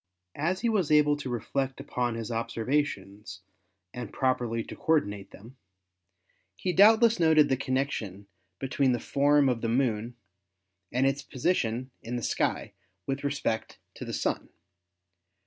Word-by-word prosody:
As 175 +5 0
he 235 - +1
was 205 -8 +1
able 150 -1 +5
to 145 -3 -6
reflect 135 +3 -2
upon 125 -4 -2
his 115 0 -5
observations 115 -5 -2 0.5
and 125 -4 -6
properly 120 -3 0
to - - -9
coordinate 105 -11 0
them, 115 +6 -14 1.0
he 180 - -2
doubtless 220 +3 +6
noted 160 -2 +5
the 135 - +3
connection 130 -7 -2 0.3
between 135 -1 +1
the 120 - -1
form 145 +2 +3
of 120 -3 0
the 115 - -1
Moon 120 -2 0 0.8
and 130 +2 +1
its 135 +1 +1
position 130 -4 -1
in 120 +2 -5
the 120 - -3
sky - - -1 0.3
with 135 +1 -3
respect 140 -6 -2 0.2
to - - -8
the - - -6
Sun. - - -2
130 Hz, 140 wpm, -28 LUFS, 115-145 Hz, 1.0 s, doubtless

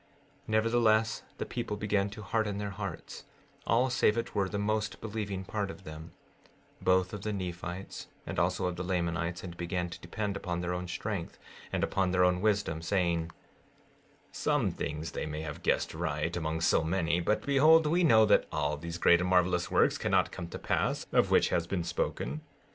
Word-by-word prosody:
16:15 - - -31
Nevertheless, 110 0 +2
the - - -3
people 115 -4 -4
began 100 -1 0
to 105 +1 -9
harden 105 -1 -1
their 100 0 -3
hearts, 100 -4 -7 0.4
all 125 +3 +3
save 115 -4 +3
it 115 +1 -3
were 100 -2 0
the 100 - -3
most 110 0 -1
believing 100 -3 -4
part 100 0 -2
of 95 - -9
them, 80 +1 -9 0.7
both 95 0 +2
of 105 - -5
the 105 - -2
Nephites 90 -1 -5 0.2
and - - -3
also - - +1
of 90 -1 -2
the 90 - -3
Lamanites, 85 -1 -1
and 85 -2 -7
began 90 0 -2
to - - -8
depend 100 +3 -3
upon 90 -3 -3
their 90 0 -2
own 90 0 -4
strength 95 -1 -4 0.3
and - - 0
upon 95 -2 +1
their 90 0 +3
own 90 0 +3
wisdom, 100 -7 +1
saying: 85 -2 0 1.1
16:16 - - -15
Some - - +1
things 75 +2 -4
they - - -4
may 75 0 -4
have 75 -2 -6
guessed - - +1
right, 80 0 -2
among 80 -1 -2
so 80 - +3
many; 85 0 +1
but 105 +5 0
behold, 155 +3 +6
we 170 +4 +2
know 110 -8 +6
that 105 - +4
all 75 -1 -1
these 85 +2 -5
great 85 0 +5
and 90 - -1
marvelous 90 -1 +2
works - - +3
cannot - - +2
come 85 - -6
to 85 - -7
pass, - - -1
of - - +3
which - - +4
has 85 -1 0
been 90 -2 -1
spoken. 75 -4 -2
90 Hz, 195 wpm, -30 LUFS, 85-105 Hz, 1.1 s, behold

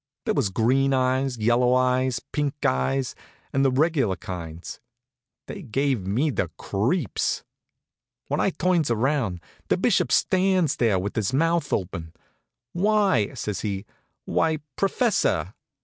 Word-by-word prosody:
There - - +1
was 130 -9 +1
green 135 +7 +2
eyes, 130 0 +1
yellow 120 +3 +3
eyes, 130 -1 +2
pink 145 -1 -1
eyes, 120 - 0 0.4
and 135 - +2
the 135 - +4
regular 135 - +1
kinds. 85 -2 -7 0.7
They - - -7
gave 130 -4 -1
me 130 +10 +1
the - - -1
creeps. 120 - -1 0.8
When - - -1
I - - +3
turns 175 -6 +1
around, 115 - 0 0.3
the - - +2
Bishop - - +2
stands 185 -5 +2
there 115 -5 +2
with 100 +3 -3
his 110 +1 -1
mouth 165 +1 +1
open. 85 -4 -3 0.6
"Why," 195 - +2
says 105 -3 -3
he 100 -1 -3 0.4
"why, 160 -1 +1 0.2
professor!" 195 - +1
130 Hz, 130 wpm, -25 LUFS, 105-150 Hz, 0.8 s, the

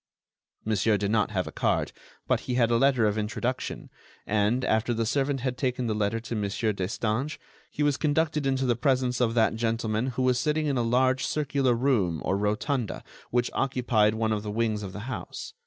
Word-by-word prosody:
Monsieur 110 0 +2
did 100 +1 -1
not 110 -2 +2
have 95 -4 -1
a - - -7
card, - - 0 0.4
but - - +2
he 125 - -3
had 120 -2 +3
a 115 - +4
letter 130 -2 +3
of 105 +1 +1
introduction 120 +4 -3 0.3
and, 110 +5 +1
after 110 +2 +1
the 115 0 0
servant 135 +2 0
had 125 -1 -2
taken 125 -2 -1
the 110 - 0
letter 105 +1 0
to 115 +1 -6
Mon. 105 -2 -1 0.2
Destange, 110 +8 -2 0.3
he 150 - -2
was 145 -2 +2
conducted 155 -1 +1
into 135 0 +1
the 120 -2 +2
presence 125 -1 +1
of 115 -1 +1
that 110 -2 +3
gentleman 115 0 -1
who 130 0 -2
was 125 -1 +3
sitting 155 +3 0
in 145 -2 0
a - - +2
large 130 +3 +2
circular 140 -4 +1
room 115 - +1
or 95 - +1
rotunda 105 +4 -1 0.3
which 120 0 0
occupied 120 -5 +2
one 110 0 0
of 105 - -1
the 105 - -6
wings 110 0 0
of 100 -2 -6
the 105 - -7
house. 125 +1 -6
120 Hz, 200 wpm, -27 LUFS, 110-130 Hz, 0.4 s, a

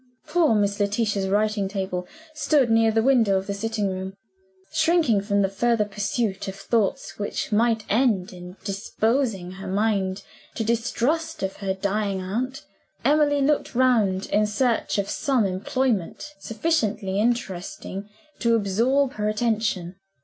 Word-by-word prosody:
Poor 330 -10 +3
Miss 200 0 +1
Letitia's 205 -1 0
writing 205 0 +1
table 190 -2 -3 0.3
stood 295 -5 +2
near 225 0 +4
the 220 0 +2
window 230 -7 +4
of 190 - -3
the 200 - -3
sitting 215 0 -2
room. 190 0 -4 0.6
Shrinking 315 - +3
from 200 0 +1
the - - +3
further 215 +3 +1
pursuit 205 0 -2
of 195 - -5
thoughts 205 +1 -1
which 205 - -3
might 225 0 +2
end 210 -6 +1
in 180 +1 -10
disposing 210 0 -1
her 190 +1 -8
mind 195 -1 0 0.3
to 225 - -1
distrust 240 +8 -1
of 190 0 -3
her 195 -1 -2
dying 200 0 -1
aunt, 255 +10 -3 0.4
Emily 290 -1 +3
looked 290 -2 0
round 220 -7 +3
in 210 +1 +3
search 230 +2 0
of 200 -1 0
some 255 0 +1
employment 210 - -1
sufficiently 215 -8 -1
interesting 205 -3 -2 0.3
to 235 -1 +3
absorb 235 +7 +2
her 210 0 -1
attention. 215 -5 -1
210 Hz, 140 wpm, -24 LUFS, 195-240 Hz, 0.6 s, near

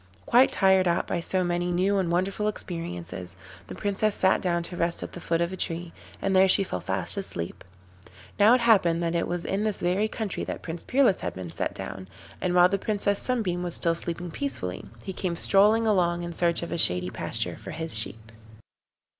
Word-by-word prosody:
Quite 250 +3 +5
tired 190 -1 +3
out 170 - +1
by - - -2
so 185 +2 -1
many 175 0 -1
new 190 +3 +1
and 175 -3 -1
wonderful 190 +4 0
experiences, 90 - -5 0.3
the - - -8
Princess 205 +1 -1
sat 190 0 +3
down 170 -2 0
to 175 - -8
rest 170 0 -1
at - - -7
the - - -9
foot 165 0 -1
of 170 +2 -1
a - - -3
tree, 170 -1 -3 0.3
and 195 -1 0
there 190 +1 +6
she 195 +1 +6
fell 90 - -4
fast 95 - 0
asleep. 90 - 0 0.8
Now 215 +4 +7
it 255 - 0
happened 180 -8 +3
that 165 0 -1
it 170 - 0
was 175 0 -3
in 195 +2 -1
this 215 -2 -1
very 185 +5 +1
country 215 -3 -4
that - - -6
Prince 165 0 -6
Peerless 255 -7 +2
had 90 -2 -5
been 90 -2 -7
set - - -3
down, 95 0 -7 0.3
and 180 -1 0
while 180 0 +7
the 200 +1 -1
Princess 200 -1 0
Sunbeam 210 -9 -1
was 175 -1 -1
still 170 - +2
sleeping 170 +1 -5
peacefully, 160 - -4 0.2
he 190 - -5
came 180 -2 -3
strolling 210 +6 +3
along 175 -5 +1
in 170 0 -5
search 170 0 +1
of 170 - -6
a - - -2
shady 90 - +3
pasture - - -1
for - - -10
his 160 -4 -3
sheep. 110 0 0
175 Hz, 210 wpm, -26 LUFS, 165-195 Hz, 0.8 s, Now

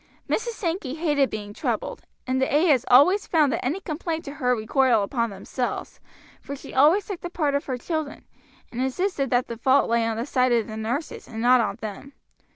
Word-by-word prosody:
Mrs. 470 +1 -1
Sankey 330 -7 -3
hated 295 -4 +1
being 205 -1 -6
troubled, - - -3 0.2
and 260 +1 0
the 265 - +1
ayahs 295 -4 +3
always 360 +11 +5
found 300 -5 +3
that - - -2
any 285 +10 -1
complaints 325 -1 -4
to 280 - -6
her 250 -4 +1
recoiled 230 0 +2
upon 235 +2 -1
themselves, 205 +5 -5 0.4
for 280 - -6
she - - -11
always 310 +9 +4
took 395 -4 -6
the 350 - -5
part 300 -5 -1
of 280 - -1
her 260 -2 -3
children, 315 +2 -4 0.5
and 245 - -4
insisted 275 +1 -1
that 245 0 +1
the 235 - -6
fault 265 +3 +3
lay 235 0 +3
on 225 -1 -2
the 230 - -2
side 255 -3 +2
of 230 -2 +2
the 215 - -8
nurses 235 +8 -4
and 225 - -7
not 245 +1 +5
on 215 - -1
them. 220 +6 -7
265 Hz, 205 wpm, -24 LUFS, 235-310 Hz, 0.5 s, always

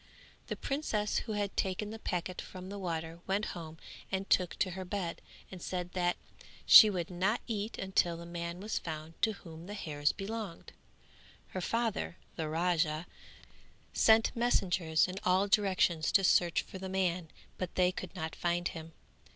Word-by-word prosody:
The - - -2
princess 230 -7 -1
who 220 - -5
had 205 -1 -2
taken 195 +2 -1
the 225 - -7
packet 180 -2 -3
from 185 0 -9
the 200 0 -6
water 165 -2 -3
went 200 +2 +1
home 165 -2 -8 0.3
and 190 +1 -1
took 180 -2 +2
to 185 - 0
her 190 +1 -5
bed 180 -2 -3 0.3
and 185 -2 -8
said 180 0 -3
that 175 -1 0 0.5
she 215 - +11
would 180 -3 -3
not 190 +6 +1
eat 215 -1 -3
until 180 -3 +1
the 170 - -8
man 170 +1 -5
was 215 +2 -2
found 160 0 -6
to 220 - +3
whom 165 -3 -11
the 205 - -6
hairs 145 -6 0
belonged. 205 -3 -6 0.8
Her 185 - -4
father, 230 -4 -1 0.2
the 160 -2 -3
Raja, 165 -1 +1 0.9
sent 220 0 +5
messengers 180 -9 +2
in 185 +1 -5
all 185 +2 +3
directions 190 -5 +2
to 195 - +5
search 175 -2 +4
for 190 - -9
the 190 0 -5
man 180 -3 0 0.3
but 185 -2 -4
they 180 -1 +4
could 185 -2 -7
not 160 0 -4
find 175 0 0
him. 165 0 -9
185 Hz, 165 wpm, -32 LUFS, 170-200 Hz, 0.9 s, she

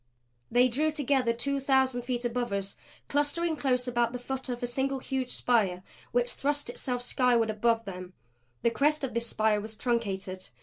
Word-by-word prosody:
They 245 +2 +5
drew 300 +6 +1
together 275 -5 +1
two 275 +4 -1
thousand 265 -2 +2
feet 245 0 -2
above 240 -1 -1
us, 200 0 -2 0.3
clustering 305 +3 +1
close 255 -3 +1
about 240 -1 +1
the - - -2
foot 265 +1 -5
of 245 0 -3
a - - +3
single 270 +3 -1
huge 260 -1 -3
spire 200 -9 +1 0.3
which 245 0 +1
thrust 290 -2 -1
itself 245 0 -3
skyward 245 -3 +3
above 230 +1 +1
them. 185 -1 -7 0.5
The 235 - +4
crest 295 +5 +2
of 265 - -2
this 235 0 -1
spire 215 -2 +2
was 220 +1 -7
truncated. 195 - -2
245 Hz, 175 wpm, -29 LUFS, 230-265 Hz, 0.5 s, They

